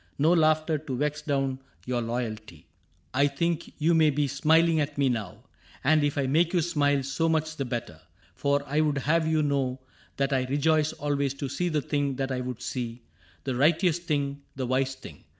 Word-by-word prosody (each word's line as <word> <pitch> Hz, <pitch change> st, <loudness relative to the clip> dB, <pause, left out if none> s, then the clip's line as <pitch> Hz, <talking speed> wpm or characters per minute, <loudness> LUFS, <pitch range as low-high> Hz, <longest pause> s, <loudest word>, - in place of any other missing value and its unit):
No 160 Hz, +4 st, +4 dB
laughter 155 Hz, -1 st, +3 dB
to 135 Hz, -4 st, -5 dB
vex 150 Hz, +2 st, -1 dB
down 135 Hz, -3 st, -1 dB, 0.3 s
your 125 Hz, -1 st, -1 dB
loyalty. 115 Hz, -5 st, -4 dB
^^ 75 Hz, -, -22 dB, 0.5 s
I 140 Hz, +2 st, +4 dB
think 170 Hz, +4 st, -2 dB
you 165 Hz, +2 st, +2 dB
may 160 Hz, -2 st, +5 dB
be 145 Hz, 0 st, +1 dB
smiling 160 Hz, +4 st, +3 dB
at 145 Hz, -1 st, -2 dB
me 140 Hz, -2 st, +3 dB
now 110 Hz, -7 st, -4 dB, 0.2 s
— -, -, -25 dB
And 155 Hz, +2 st, +4 dB
if 145 Hz, -1 st, 0 dB
I 140 Hz, -, +1 dB
make 160 Hz, +6 st, +2 dB
you 175 Hz, -, +4 dB
smile, 145 Hz, -4 st, +1 dB
so 150 Hz, +5 st, 0 dB
much 155 Hz, 0 st, 0 dB
the 140 Hz, -, -3 dB
better; 115 Hz, -10 st, -5 dB, 0.3 s
For 140 Hz, 0 st, 0 dB
I 150 Hz, +2 st, +1 dB
would 150 Hz, -2 st, +1 dB
have 160 Hz, +4 st, +1 dB
you 160 Hz, -1 st, +2 dB
know 135 Hz, -3 st, 0 dB, 0.4 s
that 140 Hz, 0 st, 0 dB
I 130 Hz, -1 st, +1 dB
rejoice 150 Hz, +3 st, +2 dB
Always 140 Hz, -1 st, -1 dB
to 140 Hz, -, -4 dB
see 175 Hz, +7 st, -1 dB
the 150 Hz, -3 st, 0 dB
thing 145 Hz, -2 st, -1 dB
that 135 Hz, 0 st, -2 dB
I 130 Hz, -1 st, -1 dB
would 125 Hz, -1 st, -5 dB
see 120 Hz, -2 st, -4 dB, 0.2 s
— 90 Hz, -, -30 dB
The 130 Hz, -, -2 dB
righteous 165 Hz, +6 st, +3 dB
thing, 145 Hz, -4 st, -2 dB
the 130 Hz, -1 st, -3 dB
wise 130 Hz, +2 st, 0 dB
thing. 85 Hz, -, -12 dB
140 Hz, 205 wpm, -27 LUFS, 130-155 Hz, 0.5 s, may